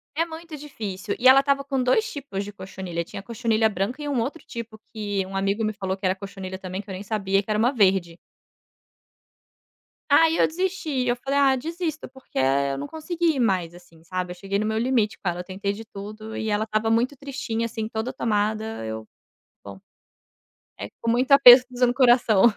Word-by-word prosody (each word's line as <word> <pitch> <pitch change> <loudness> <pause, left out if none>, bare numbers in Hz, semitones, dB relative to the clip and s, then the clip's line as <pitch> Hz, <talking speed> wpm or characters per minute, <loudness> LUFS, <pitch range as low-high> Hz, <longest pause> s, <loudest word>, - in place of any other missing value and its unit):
É 330 +2 +1
muito 325 -1 -9
difícil, 210 -9 -5
e 255 - +4
ela 265 +1 +9
estava 275 0 +1
com 275 -2 -1
2 345 - +2
tipos 265 -9 -5
de 205 - -9
cochonilha, 185 -3 -5
tinha 195 +3 -9
cochonilha 230 -1 +1
branca 205 +6 -3
e 295 - -4
1 275 -4 0
outro 285 +6 -4
tipo 230 -2 -8
que 205 -3 -2
um 190 +1 -9
amigo 200 +3 0
me 215 - -1
falou 190 -2 -3
que 190 - -6
era 185 - +3
cochonilha 190 -1 -7
também 190 +1 -5
que 200 - -17
eu - - -5
nem 185 - -6
sabia 195 -2 0
que 200 - -17
era 210 - +1
1 235 +4 +3
verde. 190 -6 +2 1.9
Aí 325 +3 +5
eu - - +4
desisti, 320 -7 -2
eu 240 - +2
falei: 275 +3 -1
"Ah 270 -1 +5
desisto." 320 +3 -4
Porque 265 0 -13
eu 135 +1 +2
não 140 - -5
consegui 325 -1 -1
mais, 185 -8 +1
assim, 170 -2 -17
sabe, 180 +1 -4
eu - - -7
cheguei 195 +2 -2
no 215 - -1
meu 220 0 -1
limite 230 -3 +1
com 185 - -2
ela, 175 +1 -4
tentei 195 +2 -3
de 225 +2 -9
tudo 215 +1 -9
e 220 - -3
ela 210 +1 0
estava 215 0 0
muito 235 +5 +1
tristinha 255 -5 -4
assim 220 -1 -4
toda 225 +3 -4
tomada 220 - -1
eu, 110 0 -6 0.6
bom, 100 -1 -9 1.0
é 100 - -6
com 230 - 0
muito 250 +3 +1
aperto 255 -2 +10
dizendo 245 0 +1
coração. 240 -6 +4
220 Hz, 200 wpm, -24 LUFS, 195-260 Hz, 1.9 s, aperto